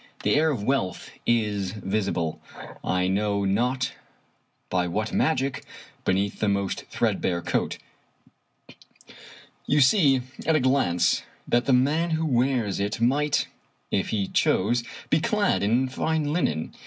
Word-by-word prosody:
The - - +2
air 155 +2 +3
of 125 -9 -2
wealth 115 -8 -1 0.2
is 105 -5 +1
visible, 95 -6 -2 0.4
I 90 0 +1
know 100 +1 0
not 125 +6 0 0.8
by 90 -1 +1
what 105 +5 -2
magic, 135 -4 0 0.4
beneath 100 +2 0
the 105 - +1
most 100 -1 -1
threadbare 85 -2 -1
coat. - - -1 1.9
You 150 - +3
see 140 -2 +4 0.3
at 160 - +4
a - - +4
glance 125 - +2 0.3
that 120 0 +2
the 135 - +3
man 145 +7 +2
who 160 - -1
wears 125 -7 +1
it 100 +2 -2
might, 140 +5 +2 0.4
if 95 - 0
he 100 -3 -1
chose, 120 +5 +1 0.3
be 155 - +4
clad 210 +2 +1
in 120 +6 +2
fine 150 +3 -1
linen. 80 - -1
120 Hz, 130 wpm, -25 LUFS, 100-140 Hz, 1.9 s, see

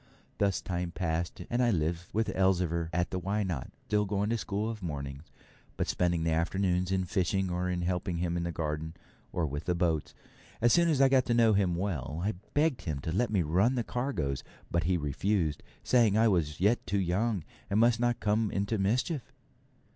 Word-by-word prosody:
Thus 100 -2 +1
time 90 -1 -3
passed, 85 -1 -2
and 120 +1 0
I 120 - +4
lived 85 -2 0
with 110 -3 -1
Elzevir 90 -3 +1
at 90 +1 0
the 95 - -1
Why 100 +4 -1
Not?, 85 -9 -3 0.2
still 105 -1 +1
going 100 +2 -1
to 115 - +1
school 100 +2 -2
of 110 -2 -5
mornings, 70 -3 -5 0.5
but - - 0
spending 85 -2 +1
the 80 - +1
afternoons 90 +2 +1
in 95 -1 +1
fishing, 95 0 0
or 90 +1 -1
in 90 -1 -1
helping 90 0 -1
him 85 0 -1
in 85 - -1
the 85 0 -2
garden, 80 0 -3 0.4
or 85 - 0
with 75 +2 -4
the 90 - +1
boats. 85 -3 0 0.4
As 120 +1 +4
soon 170 -1 +4
as 145 -4 +2
I 135 - +7
got 130 -1 +3
to 120 - +2
know 115 -2 +5
him 95 -4 +2
well, 80 -6 -3
I 105 +3 0 0.2
begged 145 - +2
him 80 -6 -3
to 80 - -3
let 115 +8 +1
me 100 -4 +2
help 75 -2 -3
run 105 +10 +3
the 120 - 0
cargoes, 100 - -2 0.3
but 85 -1 +1
he 90 +1 +2
refused, 80 +2 0 0.2
saying 115 -5 +4
I 115 +1 +5
was 80 -7 +1
yet 105 +6 +2
too 100 - +1
young, 95 +2 0 0.3
and 100 +1 +2
must 115 0 +4
not 120 -1 +1
come 110 +1 +1
into 100 +2 -1
mischief. 125 - +1
95 Hz, 205 wpm, -30 LUFS, 85-110 Hz, 0.5 s, I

